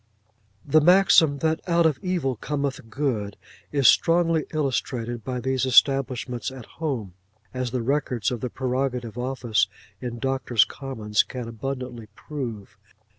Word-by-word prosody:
The 155 +2 +4
maxim 175 -3 +5
that 160 0 +1
out 170 0 +4
of 150 -5 +2
evil 175 -9 -1
cometh 140 -1 -3
good, 110 -6 -2 0.3
is 140 -4 +3
strongly 165 +1 +4
illustrated 120 -5 -2
by 125 -1 -3
these 130 +1 -1
establishments 130 -2 +2
at 130 -3 -10
home; 130 - -4 0.4
as 130 -1 -2
the 125 -1 -2
records 130 -3 0
of 120 -3 -4
the 125 - -2
Prerogative 125 -2 -2
Office 120 -5 0 0.3
in 120 -2 -4
Doctors' 130 -3 +2
Commons 110 -6 -1
can 125 -3 -6
abundantly 125 -1 -5
prove. 115 -8 -7
130 Hz, 130 wpm, -25 LUFS, 120-145 Hz, 0.4 s, maxim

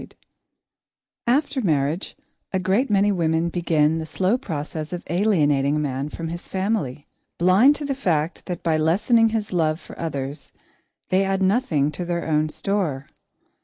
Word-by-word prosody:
[Sidenote: - - -13 1.1
The - - +4
Destroyer] 255 - +6
After 290 -2 -2
marriage, 155 - -1 0.4
a - - +2
great 190 +8 +1
many 205 0 +3
women 165 -2 +1
begin 165 -2 +1
the 160 - -5
slow 190 +7 +1
process 155 - -5
of 175 - -5
alienating 150 -8 +2
a - - 0
man 140 -1 -2
from 165 +1 -5
his 170 +1 -7
family, 190 - -2 0.3
blind 195 - +5
to 295 - -5
the 280 - -1
fact 170 - -1
that 180 -2 -5
by 160 -2 +2
lessening 215 +9 +3
his 220 -3 -3
love 160 -2 +1
for - - -13
others, 140 -3 -5 0.6
they 190 +1 +3
add 195 0 0
nothing 185 - +2
to 180 - -5
their 170 0 -2
own 155 0 +1
store. 155 -7 -2
170 Hz, 165 wpm, -23 LUFS, 155-200 Hz, 1.1 s, Destroyer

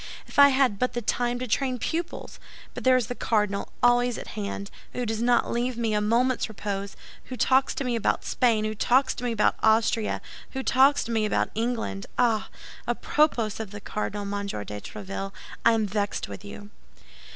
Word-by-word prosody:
If - - -3
I 280 0 +10
had 260 -7 +2
but 250 - 0
the 240 - -3
time 245 +2 0
to 255 +1 -4
train 255 +2 0
pupils! 335 +7 -4 0.3
But - - -7
there 255 0 +5
is 250 - 0
the 245 - -4
cardinal 210 -4 0
always 245 0 +4
at - - -8
hand, 200 -1 -5 0.2
who 250 - -2
does 225 0 -2
not 240 0 +2
leave 240 +1 -1
me 225 -2 0
a 210 - +2
moment's 235 +4 +1
repose; 200 -2 -4 0.3
who 255 - -7
talks 265 +2 +3
to - - -2
me 250 -2 -1
about 225 - 0
Spain, 225 -4 +2
who 215 - -1
talks 250 +5 +3
to - - -8
me 245 - 0
about 215 -2 +2
Austria, 220 0 +2 0.3
who 265 0 -3
talks 270 +3 +4
to 235 - -5
me 220 -1 +1
about 210 - 0
England! 225 - -2
Ah! 230 -3 +2 0.4
à - - -1
propos 240 -9 +1
of 220 -3 -4
the 205 +1 -8
cardinal, 205 0 -4
Monsieur 200 - -3
de 105 0 -7
Tréville, 195 - -6 0.3
I 230 - +6
am 220 -1 +1
vexed 205 0 -2
with 100 -1 -9
you!" 100 0 -10
225 Hz, 195 wpm, -26 LUFS, 205-250 Hz, 0.4 s, I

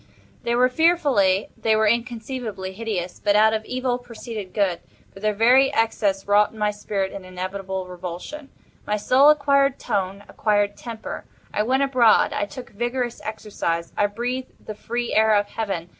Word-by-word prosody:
They 235 - 0
were 250 +1 +5
fearfully—they 250 - +2
were 220 0 +3
inconceivably 230 -3 -2
hideous; 190 -4 -4
but 205 -1 +3
out 220 +1 +5
of 220 0 -1
Evil 255 -1 -1
proceeded 230 -5 -8
Good; 195 -5 0 0.3
for - - -12
their 210 0 0
very 255 +5 +5
excess 205 -4 0
wrought 205 +1 +4
in - - -14
my 210 -1 +1
spirit 205 -2 -3
an 195 - -8
inevitable 185 +1 -5
revulsion. 180 - -7 0.4
My 210 - +1
soul 260 +7 +5
acquired 280 -2 +3
tone—acquired 205 +1 -1
temper. 230 -2 -7 0.3
I - - +1
went 260 +5 +2
abroad. 255 -5 +4
I 205 - -1
took 245 +5 -10
vigorous 240 +2 -3
exercise. 205 -6 -3
I 205 - +2
breathed 245 +5 -5
the 215 - -5
free 240 +3 -3
air 220 0 +4
of 205 0 +2
Heaven. 195 -6 -4
215 Hz, 160 wpm, -23 LUFS, 200-245 Hz, 0.4 s, were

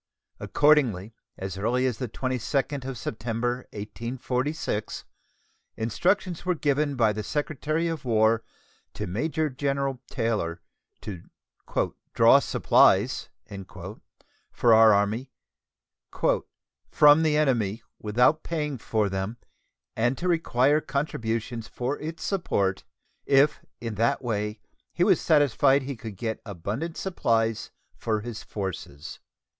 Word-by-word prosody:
Accordingly, 125 -9 +2 0.2
as 95 0 -5
early 125 +5 +1
as 125 -4 -1
the 125 - -2
22d 130 +3 -2
of 135 -2 -5
September, 120 +3 -3
1846, 125 +4 -3 0.7
instructions 165 - 0
were 180 0 +1
given 145 -1 0
by 110 -4 +3
the 105 - -3
Secretary 155 +6 -1
of 165 -2 -3
War 115 -2 +3 0.5
to 105 - -3
Major 150 - -1
General 135 -1 -1
Taylor 110 -9 -1 0.4
to 95 -5 -7 0.9
"draw - - +7
supplies" - - +3 1.2
for 120 - +4
our 110 0 +8
Army 105 +6 +1 1.6
"from 150 +1 +6
the 155 -2 +2
enemy 115 -8 +1 0.2
without 125 +9 +3
paying 150 -5 -3
for 110 -1 0
them, 95 +4 -3 0.6
and 120 +3 +1
to 180 - -3
require 150 -4 +3
contributions 115 -6 -3
for 125 +4 -3
its 160 +2 -6
support, 100 - 0 0.4
if 140 +2 +4 0.2
in 115 -2 -4
that 115 +5 +1
way 105 -2 -2 0.3
he - - +1
was - - +4
satisfied 140 -2 +4
he 135 +1 -4
could 110 -2 -8
get 110 +1 -3
abundant 105 - -4
supplies 115 - 0 0.3
for 110 -2 -1
his 115 0 -6
forces." 95 -8 -6
120 Hz, 115 wpm, -26 LUFS, 110-145 Hz, 1.6 s, our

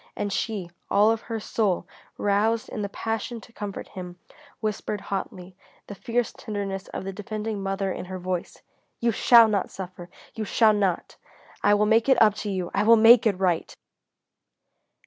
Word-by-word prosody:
And 205 -1 -3
she, 195 -6 -3 0.2
all 210 +2 +4
of 225 0 -1
her 225 -1 -5
soul 205 -4 -1 0.3
roused 215 +3 +1
in 215 - -5
the 200 - -3
passion 225 +3 -4
to 230 - -17
comfort 205 -3 -6
him, 180 -1 -8 0.4
whispered 210 -1 -3
hotly, 185 -2 -6 0.3
the - - -8
fierce 235 +4 -2
tenderness 200 -3 -5
of - - -6
the 195 0 -5
defending 210 +1 -4
mother 195 0 -2
in - - -5
her 185 +1 -6
voice: 180 -1 -5 0.4
"You 235 0 +2
shall 230 +1 +6
not 205 -3 0
suffer! 180 -2 -9 0.2
You 220 - -4
shall 215 +1 +4
not! 195 -4 -1 0.5
I 205 0 +5
will 210 +1 +2
make 225 +4 +3
it 265 - +5
up 215 -2 +6
to 210 - -4
you! 185 -3 -3
I 200 - +1
will 225 +2 +6
make 225 +1 +7
it 200 -4 +1
right!" 180 -3 0
205 Hz, 175 wpm, -25 LUFS, 190-220 Hz, 0.5 s, make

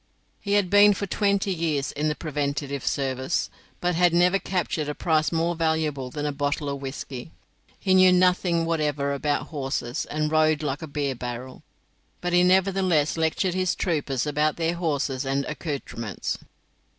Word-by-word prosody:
He 200 - -2
had 205 -3 +2
been 205 0 +7
for 200 - -3
twenty 200 -1 +1
years 155 -5 -1
in 150 +2 -1
the 150 - 0
preventive 140 -3 -3
service, 130 +1 -1 0.3
but 180 0 0
had 175 0 +3
never 180 +3 +4
captured 170 -6 -2
a 150 - -3
prize 155 -2 +1
more 165 +1 +1
valuable 160 -5 -1
than 145 +3 -4
a 145 - 0
bottle 145 +1 -2
of 140 -1 -4
whisky. 135 -1 -6 0.5
He 190 - +1
knew 185 0 +7
nothing 180 -2 +3
whatever 150 -4 0
about 145 +1 -1
horses, 135 -5 -3
and 155 0 -1
rode 155 -1 +3
like 145 +1 -2
a 160 - -5
beer 145 -2 -2
barrel, 125 +1 -7 0.6
but 175 0 -2
he 175 - +6
nevertheless 185 -4 +3
lectured 165 +3 0
his 185 -1 0
troopers 145 -7 -1
about 150 +1 +1
their 165 0 0
horses 145 -6 -1
and 135 0 -1
accoutrements. 140 - -4
155 Hz, 165 wpm, -25 LUFS, 140-175 Hz, 0.6 s, been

